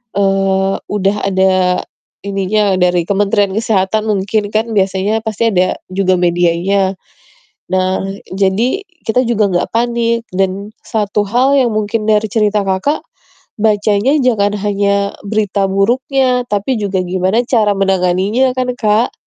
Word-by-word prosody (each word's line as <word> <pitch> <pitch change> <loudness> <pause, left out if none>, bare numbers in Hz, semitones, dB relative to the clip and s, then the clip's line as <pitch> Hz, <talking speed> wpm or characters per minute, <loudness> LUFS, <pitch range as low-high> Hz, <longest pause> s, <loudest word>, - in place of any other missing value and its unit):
eee, 195 -1 +1
udah 205 0 0
ada 185 -1 +2 0.4
ininya 200 0 0
dari 180 -1 +2
Kementerian 200 0 +1
Kesehatan 215 -1 0
mungkin 205 0 -1
kan 220 +2 0
biasanya 195 +3 0
pasti 220 +1 0
ada 185 -3 +1 0.2
juga 185 -1 +1
medianya. 175 +3 +1 0.8
Nah, 185 0 0 0.3
jadi 200 - 0 0.2
kita 235 +3 +1
juga 210 -4 +1
nggak 175 - 0
panik. 235 0 0
Dan 195 +2 -2
satu 210 -2 -1
hal 255 +5 +2
yang 250 - +2
mungkin 215 +1 -1
dari 215 0 +3
cerita 210 -2 +1
Kakak, 190 +11 -1 0.6
bacanya 210 +4 +2
jangan 210 -5 +1
hanya 200 0 0
berita 205 -1 0
buruknya, 250 +5 +1
tapi 205 +5 -1
juga 195 -2 -1
gimana 185 +6 0
cara 220 -4 +2
menanganinya 195 +6 +1
kan, 255 -1 -1
Kak, 215 +1 +1
205 Hz, 125 wpm, -15 LUFS, 190-220 Hz, 0.8 s, dari